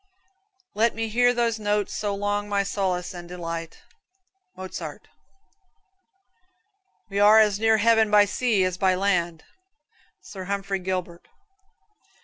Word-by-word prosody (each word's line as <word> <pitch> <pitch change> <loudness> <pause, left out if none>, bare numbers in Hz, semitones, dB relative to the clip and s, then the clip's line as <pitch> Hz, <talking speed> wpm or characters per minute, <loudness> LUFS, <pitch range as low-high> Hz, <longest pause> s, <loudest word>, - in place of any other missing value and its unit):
"Let 225 +2 +1
me 225 0 -3
hear 245 +3 +3
those 235 -2 -1
notes 205 -1 -1
so 205 -1 -2
long 205 +1 -2
my 200 -1 +1
solace 185 -3 -2
and 175 -1 -10
delight." 165 -2 -7 0.7
Mozart. 185 0 -8 2.0
"We 200 - -1
are 210 +2 +7
as 210 -2 +3
near 220 0 +3
heaven 225 0 +3
by 210 0 +6
sea 215 -1 0
as 185 0 -2
by 190 -1 +3
land," 175 -4 -1 0.8
Sir 190 -2 -9
Humphrey 195 0 -3
Gilbert. 180 -2 -5
200 Hz, 125 wpm, -24 LUFS, 185-215 Hz, 2.0 s, are